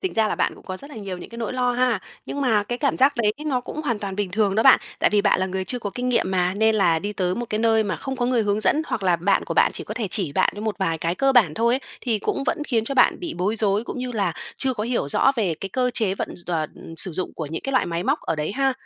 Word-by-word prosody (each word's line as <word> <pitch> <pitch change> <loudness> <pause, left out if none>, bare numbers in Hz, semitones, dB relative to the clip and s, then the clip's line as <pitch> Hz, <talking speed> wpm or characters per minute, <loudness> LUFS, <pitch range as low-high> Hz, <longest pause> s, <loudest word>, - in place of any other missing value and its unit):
Tính 375 - -2
ra 220 -1 +2
là - - -1
bạn - - 0
cũng - - -17
có 185 - -4
rất 280 +9 -12
là 275 - -10
nhiều 195 -4 -5
những - - -10
cái 235 - -9
nỗi 230 -1 -3
lo 250 -1 +1
ha, 245 -4 +1 0.3
nhưng 285 - -4
mà 225 -6 +3
cái 240 +4 -4
cảm 280 - +1
giác 270 +2 +5
đấy 215 -3 +2
nó 260 -4 +1
cũng 300 - -6
hoàn 235 -7 -1
toàn 195 -2 -5
bình 205 -3 -2
thường 200 0 +1
đó 220 - +3
bạn. 265 0 +7 0.2
Tại - - +4
vì 210 -1 +3
bạn 200 -2 +3
là 190 - +1
người 190 0 -3
chưa 245 - -3
có 205 -3 -4
kinh 250 0 -2
nghiệm 235 -6 +1
mà, 180 -1 +1
nên 220 +2 +3
là 170 -6 +3
đi 205 +5 -4
tới 185 -2 -1
một 240 +2 -4
cái 215 - 0
nơi 225 -1 +3
mà 205 - -2
không 270 -1 -5
có 245 -1 0
người 245 -3 +2
hướng 205 0 0
dẫn 305 +8 +2
hoặc - - -3
là 180 -2 +3
bạn 190 +4 +1
của - - -4
bạn - - +4
chỉ - - -3
có 215 - -6
thể 230 -3 -2
chỉ 180 -9 0
bạn - - +2
như - - -5
một 215 -1 -3
vài 165 -4 0
cái 170 +2 -1
cơ 270 +6 +2
bản 205 -12 +4
thôi 235 +2 +2
ấy, 265 - -1 0.2
thì 230 -4 0
cũng 245 - -2
vẫn 335 - 0
khiến 225 -4 +1
cho 275 - -3
bạn 260 - +4
bị 345 -2 -4
bối 195 +5 0
rối, 210 0 +1
cũng - - -6
như 250 0 -3
là 195 -7 0 0.2
chưa 260 -1 +1
có 210 - -3
hiểu 235 - -1
rõ 270 - +4
về 195 -8 +1
cái 195 - -4
cơ 250 +5 0
chế 210 -5 +1
vận - - -3
d 175 - -11
tòa 165 -3 -1
ừm, 165 - -11
sử 185 - -2
dụng 185 +3 -2
của 160 - -4
những 160 +2 -5
cái 270 - -3
loại 255 - +2
máy 170 +1 -2
móc 280 +6 +1
ở 165 - -2
đấy 150 +5 -2
ha. 270 +1 +1
215 Hz, 330 wpm, -23 LUFS, 190-250 Hz, 0.3 s, bạn